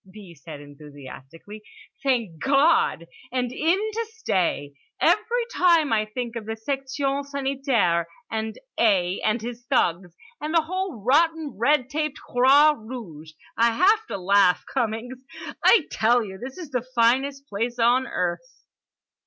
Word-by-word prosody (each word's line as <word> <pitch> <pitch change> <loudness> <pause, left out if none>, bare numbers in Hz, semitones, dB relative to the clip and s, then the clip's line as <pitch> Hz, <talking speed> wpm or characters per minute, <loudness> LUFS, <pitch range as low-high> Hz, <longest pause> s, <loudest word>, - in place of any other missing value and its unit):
B. 195 -3 -12
said 150 -1 -11
enthusiastically. 145 +6 -12 0.4
"Thank 230 - -1
God! 280 - +3 0.3
And 250 -1 -1
in 320 +7 +1
to 435 +2 -3
stay. 185 - -2 0.3
Every 440 +7 +2
time 335 -7 +3
I 215 -1 +2
think 235 +2 -6
of 220 -2 -6
the 220 - -3
section 275 +3 -2
sanitaire, 270 - 0 0.2
and 220 0 -3 0.2
A. 190 -5 +2
and 215 +1 0
his 240 0 -7
thugs, 180 -9 0 0.3
and 305 +3 -3
the 330 - +4
whole 370 - -4
rotten 315 +4 +2
red 260 +4 +2
taped 305 -1 -2
Croix 275 +5 +4
Rouge, 215 - -10 0.2
I 230 0 +3
have 420 - +3
to - - -4
laugh. 195 0 +3
Cummings, 245 0 -2 0.4
I 420 -10 +6
tell 235 +1 +2
you 190 -1 -9
this 260 +5 -8
is 335 -5 -9
the 250 -2 -1
finest 270 +4 +1
place 230 +3 -3
on 245 +2 +3
earth!" 180 - -4
245 Hz, 140 wpm, -24 LUFS, 205-290 Hz, 0.4 s, I